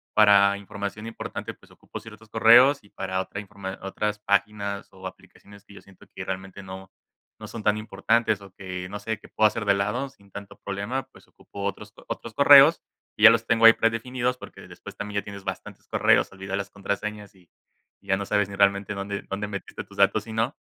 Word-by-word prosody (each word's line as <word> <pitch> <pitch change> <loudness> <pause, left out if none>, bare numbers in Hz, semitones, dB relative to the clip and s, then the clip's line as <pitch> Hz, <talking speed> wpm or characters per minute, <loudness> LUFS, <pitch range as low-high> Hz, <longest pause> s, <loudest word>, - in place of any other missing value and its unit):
para 100 -1 +6
información 100 +1 -6
importante, 115 - -6
pues - - -23
ocupo - - -10
ciertos 110 0 -14
correos 120 +5 +6
y 100 - -20
para 95 -1 -3
otra 100 - -7
informa 100 -1 -8
otras 105 +2 -2
páginas 100 0 -1
o 95 0 -13
aplicaciones 100 +2 -12
que 100 - -17
yo - - -12
siento 100 -2 -19
que - - -6
realmente 95 +1 -6
no 95 0 -10 0.5
no - - -8
son 115 - -7
tan 105 0 +2
importantes 110 +1 0
o 100 -1 -13
que 90 -1 -7
no 100 - -5
sé 110 -1 -4
que - - -15
puedo 110 - +2
hacer 105 0 -4
de 100 -1 +4
lado 105 +8 -1
sin 100 -7 -23
tanto 100 0 -10
problema, 100 +7 -3
pues - - -19
ocupo 100 - -11
otros 105 +2 -5
otros 115 - -6
correos 140 +4 +8 0.3
y 105 - -4
ya - - +13
los 115 0 +1
tengo 115 0 +4
ahí 115 - +11
predefinidos, 125 +3 -1
porque - - -12
después - - -11
también 105 -1 -3
ya - - -21
tienes 100 -1 -9
bastantes - - -7
correos, - - +3
olvidas 95 0 -5
las 100 0 -4
contraseñas 100 +1 -5
y 90 -2 -24 0.5
y 100 - -24
ya 95 -1 +2
no 100 - -4
sabes 100 0 +1
ni 100 - -7
realmente 100 +1 +2
dónde 100 +1 -4
dónde 100 +1 -3
metiste 100 -2 -7
tus - - -18
datos 110 -1 +3
y 110 - -7
no. 115 +6 -1
100 Hz, 210 wpm, -25 LUFS, 100-110 Hz, 0.5 s, ya